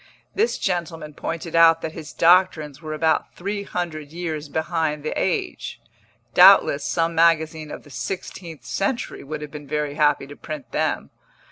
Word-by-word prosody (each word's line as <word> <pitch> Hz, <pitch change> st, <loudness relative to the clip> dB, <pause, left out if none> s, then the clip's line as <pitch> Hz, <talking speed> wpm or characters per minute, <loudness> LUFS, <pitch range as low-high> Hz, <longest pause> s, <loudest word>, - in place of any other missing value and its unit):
This 445 Hz, +4 st, +1 dB
gentleman 170 Hz, -4 st, -3 dB
pointed 165 Hz, +2 st, -5 dB
out 165 Hz, 0 st, +6 dB
that 160 Hz, -, -3 dB
his 155 Hz, -2 st, -9 dB
doctrines 165 Hz, -5 st, +3 dB
were 155 Hz, -1 st, -5 dB
about 160 Hz, +1 st, 0 dB
three 200 Hz, +3 st, -3 dB
hundred 165 Hz, -6 st, -4 dB
years 160 Hz, -3 st, -4 dB
behind 160 Hz, -1 st, -1 dB
the 155 Hz, -, -2 dB
age; -, -, -2 dB, 0.5 s
doubtless 140 Hz, 0 st, +7 dB
some 165 Hz, 0 st, 0 dB
magazine 160 Hz, -2 st, +2 dB
of -, -, -8 dB
the 145 Hz, -, -16 dB
sixteenth 165 Hz, +4 st, -6 dB
century 230 Hz, +5 st, -2 dB
would 150 Hz, +1 st, -6 dB
have 150 Hz, -, -8 dB
been 150 Hz, -1 st, -9 dB
very 150 Hz, 0 st, -2 dB
happy 150 Hz, -2 st, +2 dB
to 145 Hz, +1 st, -11 dB
print 145 Hz, -7 st, -8 dB
them. -, -, -1 dB
160 Hz, 155 wpm, -23 LUFS, 150-170 Hz, 0.5 s, doubtless